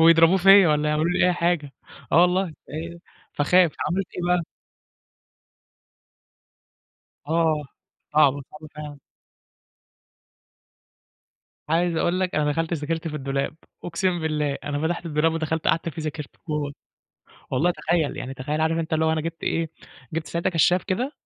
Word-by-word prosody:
ويضربوه 165 +2 +6
فيّا 195 0 +7
والّا 150 0 +2
يعملوا 150 +2 +1
لي 180 - +3
أي 180 - +3
حاجة، 170 -5 0 0.4
آه 165 - +7
والله، 180 +2 +3
أ 165 +2 -8 0.4
فاخاف، 170 +3 +4
عملت 185 +4 -1
إيه - - -3 0.2
بَقى؟ 175 - -1 2.9
آه، 160 -2 +2 0.5
صعبة، 145 -2 +4
صعبة 155 0 -11
فعلًا. 150 -1 -8 2.7
عايز 170 +1 +1
أقول 180 +3 +1
لك 185 -1 -1
أنا 150 -1 +1
دخلت 165 +2 -1
ذاكرت 160 +2 -3
في 150 - -5
الدولاب، 140 +2 -2 0.3
أُقسِم 175 -1 -1
بالله 150 -3 -1
أنا 145 -1 -2
فتحت 170 +1 -3
الدولاب 155 +1 +1
ودخلت 160 0 -1
قعدت 165 0 +1
فيه 160 0 -6
ذاكرت 150 -2 -5 0.2
جوّه، 150 -2 -2 0.8
والله 150 +7 +2
تخيّل 170 -3 0
يعني 135 +1 -5
تخيّل 145 +4 -3
عارف 160 +1 +1
أنت 165 -1 -4
اللي 160 0 +2
هو 160 - +3
أنا 160 - 0
جبت 165 +1 -6
إيه، 165 -1 -1 0.4
جبت 160 0 -3
ساعتها 170 +2 -1
كشّاف 175 +2 +3
كده، 245 +9 -2
160 Hz, 145 wpm, -24 LUFS, 150-170 Hz, 2.9 s, فيّا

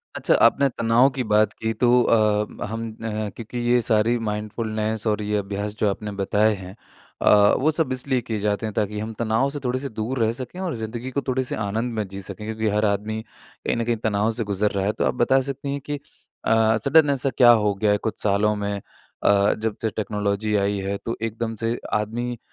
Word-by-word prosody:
अच्छा, - - +1
आपने 140 0 +4
तनाव 120 +3 +3
की 130 - -1
बात 105 -1 +3
की 110 0 -3
तो 120 +3 +2
अ, 105 -2 +1
हम 115 +1 -4
अ, 110 -1 -4
क्योंकि 115 +1 -7
ये 120 0 +4
सारी 115 +1 +2
माइंडफुलनेस 110 +1 -2
और 105 0 +1
ये 105 0 -1
अभ्यास 100 +1 -3
जो 105 - +3
आपने 105 +1 -4
बताए 105 +2 +2
हैं 95 +1 -10 0.5
अ, 105 0 +6
वो 155 +4 +3
सब 155 -4 -1
इसलिए 130 0 0
किए 110 -2 -4
जाते 105 +2 -1
हैं 110 - -4
ताकि 105 0 -1
हम 110 +1 -4
तनाव 115 +4 +1
से 145 +1 -5
थोड़े-से 130 +2 -2
दूर 115 +4 -3
रह 110 0 +2
सकें 130 +9 -6
और 180 -8 -2
ज़िंदगी 115 +3 -5
को 140 - -1
थोड़े-से 130 -1 -1
आनंद 110 +4 -2
में 105 -3 -2
जी 95 +1 -8
सकें, 105 +3 -7
क्योंकि 110 0 -2
हर 105 +1 +2
आदमी 105 +2 -1
कहीं - - -6
न 115 - 0
कहीं 120 -1 0
तनाव 105 0 +1
से 115 0 -1
गुज़र 100 0 0
रहा 95 -1 -1
है। 105 - +2
तो - - -1
आप - - +1
बता 135 +3 +3
सकती 140 +1 -4
हैं 140 0 -3
कि 145 -1 -2 0.5
अ, 110 0 +3
सडन 145 +6 +4
ऐसा 135 0 +1
क्या 120 -2 +8
हो 100 - +2
गया 105 +1 +1
है 105 - +3
कुछ - - -2
सालों 105 +1 +2
में 100 0 -2
अ, 100 +1 0
जब 110 -1 -3
से 110 - 0
टेक्नोलॉजी 105 0 -1
आई 100 0 +1
है, 100 +1 -2
तो 115 - -5
एकदम 115 0 -3
से 115 +1 0 0.2
आदमी 120 +3 -2
110 Hz, 215 wpm, -23 LUFS, 105-120 Hz, 0.5 s, क्या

